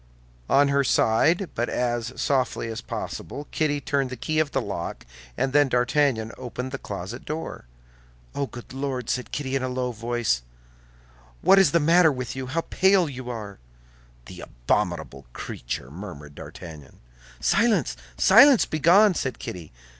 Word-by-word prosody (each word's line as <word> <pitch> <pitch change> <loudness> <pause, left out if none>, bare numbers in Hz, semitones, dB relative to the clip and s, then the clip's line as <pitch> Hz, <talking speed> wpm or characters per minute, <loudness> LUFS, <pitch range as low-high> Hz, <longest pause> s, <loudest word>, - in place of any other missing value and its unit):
On 140 +1 +4
her 140 0 +2
side, 160 - +2
but 120 +1 -1
as 120 -1 -1
softly 130 -4 0
as 110 - -5
possible, 145 0 -6
Kitty 150 -2 0
turned 140 -2 -1
the 130 - -5
key 155 -1 -1
of 155 -2 +1
the - - -1
lock, - - -5 0.3
and 135 - 0
then 145 -1 +4
D'Artagnan 125 -2 +1
opened 125 +1 -5
the 135 - -5
closet 100 +5 -7
door. 155 - -6 0.7
"Oh, 140 -1 -2
good 120 0 -11
Lord!" 135 -3 -3
said 125 0 -3
Kitty, 135 -2 -3
in 135 - 0
a 130 - -2
low 125 0 -2
voice, 115 - -1 1.0
"what 195 - +7
is 195 - +5
the 170 - +4
matter 165 +1 +5
with 125 -3 -5
you? 130 -1 -5
How 165 +6 -1
pale 190 0 +3
you 130 -3 -7
are!" 105 -4 -7 0.7
"The 90 +6 -10
abominable - - -2
creature," - - -6
murmured 75 -5 -9
D'Artagnan. 75 -2 -11 0.4
"Silence, 230 -2 +2 0.2
silence, 280 -5 +7
begone!" 180 +7 +4
said 130 -7 -3
Kitty. 85 -4 -8
130 Hz, 155 wpm, -25 LUFS, 115-150 Hz, 1.0 s, what